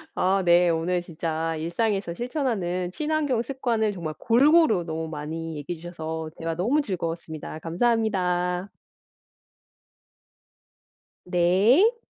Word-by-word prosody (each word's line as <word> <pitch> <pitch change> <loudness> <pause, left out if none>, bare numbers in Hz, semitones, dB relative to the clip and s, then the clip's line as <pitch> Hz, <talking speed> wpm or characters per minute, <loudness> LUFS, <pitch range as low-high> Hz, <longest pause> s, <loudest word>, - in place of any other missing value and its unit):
아 190 +1 +2
네 175 0 +5
오늘 170 +2 0
진짜 165 -1 -3
일상에서 195 +3 -1
실천하는 205 - -2
친환경 295 -1 0
습관을 235 -4 -1
정말 165 -5 -5
골고루 260 - +4
너무 160 -1 -4
많이 160 +2 -5
얘기해 160 +3 -5
주셔서 160 -2 -5
대화 165 0 -3
너무 235 - +2
즐거웠습니다. 165 - -5
감사합니다. 180 -1 0 2.6
네. 200 - +4
180 Hz, 255 characters per minute, -25 LUFS, 165-230 Hz, 2.6 s, 네